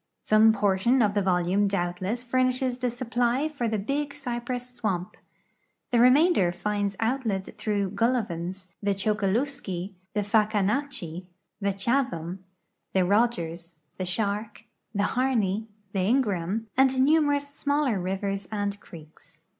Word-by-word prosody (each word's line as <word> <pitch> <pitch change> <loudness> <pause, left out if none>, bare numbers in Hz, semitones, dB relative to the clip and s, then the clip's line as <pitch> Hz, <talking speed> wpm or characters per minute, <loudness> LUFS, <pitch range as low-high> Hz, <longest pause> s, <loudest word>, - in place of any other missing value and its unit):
Some 215 +1 +6
portion 205 +4 +2
of 205 -1 +2
the 205 - +2
volume 185 +2 +2
doul)tless 190 +5 -2
furnishes 255 0 +1
the 250 0 0
supply 245 +3 0
for 280 -7 -2
tlie 210 -2 -2
Big 280 +2 -2
Cypress 245 -2 -4
swam}). 195 -7 -2 0.8
The 240 - +3
remainder 255 - +5
finds 205 +2 -2
outlet 225 -5 -1
through 205 -3 -1
Gullivans, 190 -5 -1
the 200 -1 +1
Chokaluskee, 200 -1 -1 0.2
the 210 - +2
Fahkahnatchee, 205 - 0 0.3
the 200 -1 0
Chatham, 195 -5 -1 0.5
the 190 -1 +3
Rogers, 175 -5 0 0.2
the 185 - -1
Shark, 210 +3 -1 0.3
the 200 -2 0
Harney, 220 -4 0 0.3
the 195 - 0
Ingraham, 205 -2 +1
and 265 0 +4
numerous 290 0 +3
smaller 285 -6 0
rivers 195 +2 -2
and 205 -1 -2
creeks. 160 -2 -14
210 Hz, 120 wpm, -26 LUFS, 190-250 Hz, 0.8 s, Some